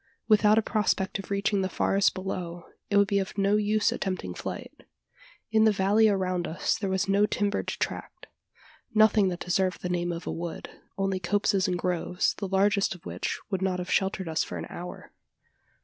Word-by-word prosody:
Without 215 -1 +5
a 225 - +4
prospect 205 -3 0
of 195 - -8
reaching 200 0 +1
the 190 - -1
forest 195 +1 +2
below 180 -2 -5 0.2
it 205 - +3
would 200 0 +5
be 200 0 +2
of 195 +1 -4
no 200 +1 +3
use 210 0 +2
attempting 185 - -3
flight. - - -7 0.7
In 220 0 +4
the 220 - +6
valley 205 +3 +4
around 185 -3 0
us 160 - 0
there 195 - -3
was 190 +1 0
no 200 +1 +3
timbered 205 0 -1
tract - - -4 0.7
nothing 215 -2 +5
that 180 -1 -3
deserved 185 +1 0
the 180 - -2
name 175 0 -1
of 170 0 -6
a - - -3
wood: 170 0 -6 0.3
only 195 -1 0
copses 195 +2 +1
and 180 -1 0
groves, 180 0 0
the 200 - -2
largest 195 +1 +2
of 175 - -17
which - - -3
would 190 -1 -1
not 190 -1 0
have 180 0 -5
sheltered 190 -1 0
us 160 -1 0
for - - -6
an - - -5
hour. 180 +1 -8
195 Hz, 190 wpm, -27 LUFS, 180-205 Hz, 0.7 s, the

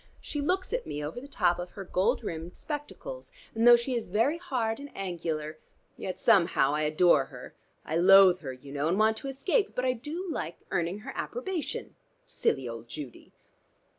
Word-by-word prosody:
She 295 - -4
looks 370 +8 -1
at - - -2
me 150 +1 -4
over 165 +11 -6
the 275 - -10
top 175 -11 +1
of 175 0 -5
her 195 - -6
gold 185 +1 +1
rimmed 165 +2 -5
spectacles, 320 +12 -6 0.2
and 225 +1 +3
though 240 - +11
she 235 +2 -1
is 235 -2 -2
very 230 - +1
hard 245 -9 -1
and 285 0 -8
angular 160 -5 -3 0.4
yet 185 -1 -5
somehow 180 - +4
I 150 - 0
adore 155 +4 +4
her. - - -11 0.3
I 160 - -1
loathe 185 0 +7
her 140 -6 -5
you 130 +2 -11
know, 145 +2 -1
and 175 +4 +1
want 220 +1 +4
to 275 - -6
escape, 315 - 0
but 250 - 0
I 255 - +3
do 305 +10 -6
like 165 - -4
earning 175 +4 -1
her - - -7
approbation. 380 -9 -4 0.3
Silly 130 -2 0
old 115 0 -7
Judy!" 135 0 -9
195 Hz, 190 wpm, -29 LUFS, -, 0.4 s, though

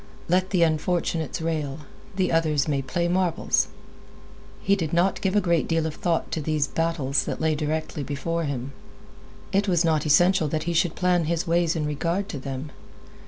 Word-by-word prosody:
Let 185 +2 +2
the 180 -3 +3
unfortunates 165 0 0
rail; 155 -3 -2 0.3
the 185 -1 +1
others 155 -3 +2
may 140 -2 0
play 170 +6 -1
marbles. 180 -1 +1 0.9
He 200 - +2
did 165 -5 -3
not 175 +3 +2
give 190 0 0
a - - +6
great 170 -3 +1
deal 165 -1 +1
of 160 - -2
thought 165 0 -1
to 160 - -2
these 155 -1 0
battles 150 -3 0
that - - -4
lay 160 0 +2
directly 155 0 -2
before 150 +4 -2
him. 135 -2 -4 0.8
It 200 +1 +1
was 175 -2 +2
not 155 -1 +1
essential 175 +2 +4
that 155 +1 -2
he 170 - -2
should 165 0 +1
plan 180 -2 +2
his 165 +1 -1
ways 170 0 +2
in 155 -2 -1
regard 170 +7 -1
to 150 - -5
them. 135 +2 -6
165 Hz, 180 wpm, -25 LUFS, 150-175 Hz, 0.9 s, a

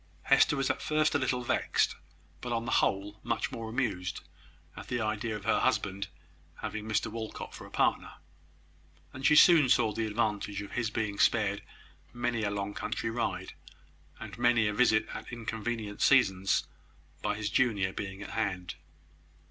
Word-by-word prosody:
Hester 135 +1 +4
was 135 -1 +1
at - - -5
first 155 0 +1
a 145 - +2
little 125 -2 0
vexed, - - +1 0.5
but 125 - -5
on 115 -1 -1
the - - -3
whole 100 +2 -1
much - - -2
more 115 -1 -5
amused, 100 -8 -2 0.5
at - - -9
the 125 - -2
idea 110 0 -2
of 105 - -8
her - - +3
husband 100 -6 0 0.5
having 110 0 -5
Mr 110 - +1
Walcot 110 -1 -6
for - - -10
a - - -14
partner: - - 0 1.0
and 135 - -8
she 150 - +5
soon 155 -4 +7
saw 115 -3 +4
the 115 0 -1
advantage 105 -2 -1
of 100 - -10
his 115 -3 -1
being 105 -2 -3
spared 100 -3 +2 0.5
many 120 -1 -1
a 105 - 0
long 100 0 -3
country 115 - -3
ride, 95 -5 -3 0.7
and 110 +1 -9
many 120 -2 +4
a 105 - -1
visit 110 -1 +3
at - - -7
inconvenient 115 -2 -4
seasons, 95 -8 +3 0.6
by 105 0 -1
his 105 0 -3
junior 100 -7 +2
being 95 0 -6
at - - -8
hand. 95 -5 -2
110 Hz, 165 wpm, -30 LUFS, 100-120 Hz, 1.0 s, soon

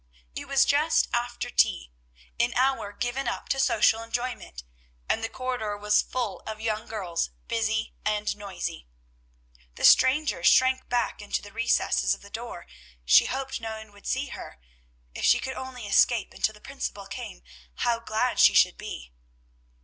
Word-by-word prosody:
It - - -6
was 275 -1 +4
just 295 +4 +3
after 240 0 -2
tea, - - +2 0.5
an 235 0 +1
hour 260 -5 +1
given 245 +5 -3
up 235 - -3
to 270 - 0
social 225 -3 +3
enjoyment, 230 - -5 0.4
and 225 - 0
the 225 - -1
corridor 245 -5 -3
was 210 0 +3
full 240 -6 -3
of 215 -1 -5
young 220 -1 -2
girls, 185 -6 -2 0.2
busy 220 -1 -1
and 210 -1 0
noisy. 195 - -6 0.9
The - - 0
stranger 290 +4 +5
shrank 260 0 +4
back 240 -3 -1
into 205 - -3
the 205 - -12
recess 230 +1 +1
of - - -18
the 200 - -14
door; 230 -6 -7 0.4
she 60 - +7
hoped 265 -1 -4
no 220 -1 -5
one 220 -1 -12
would 205 0 -13
see 265 +1 -1
her: - - -9 0.5
if - - -6
she - - +6
could 265 - -4
only 260 -3 -7
escape 215 +3 +3
until 215 - 0
the 210 - -17
principal 235 -7 -6
came, 125 - -8 0.3
how 235 -1 0
glad 230 +2 -1
she - - +7
should - - +4
be! - - -8
230 Hz, 165 wpm, -26 LUFS, 210-255 Hz, 0.9 s, she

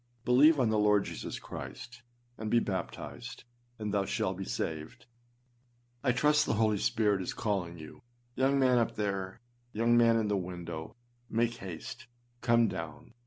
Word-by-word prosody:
Believe 145 +5 +6
on 125 -4 +3
the 110 - +2
Lord 105 -1 +4
Jesus - - -5
Christ, 120 0 -8 0.3
and 110 -2 -5
be 120 - +4
baptized, 120 +4 -4 0.3
and 105 -2 -3
thou 100 -1 +1
shalt - - -1
be - - -5
saved. 80 +9 -4 1.0
I 130 - +3
trust 150 +4 +3
the - - +1
Holy 110 -1 +2
Spirit 105 -4 +2
is 90 - -4
calling 95 -6 -2
you. 80 +7 -11 0.3
Young 135 +2 +2
man 130 -2 +4
up 115 - 0
there, 100 -2 -2 0.3
young 115 +2 +3
man 115 -1 +5
in 110 -2 +1
the 105 - +1
window, 85 -2 -6 0.3
make 115 +1 +1
haste! 120 +8 -8 0.3
come 115 -1 +4
down! 80 +4 -6
110 Hz, 160 wpm, -31 LUFS, 95-120 Hz, 1.0 s, Believe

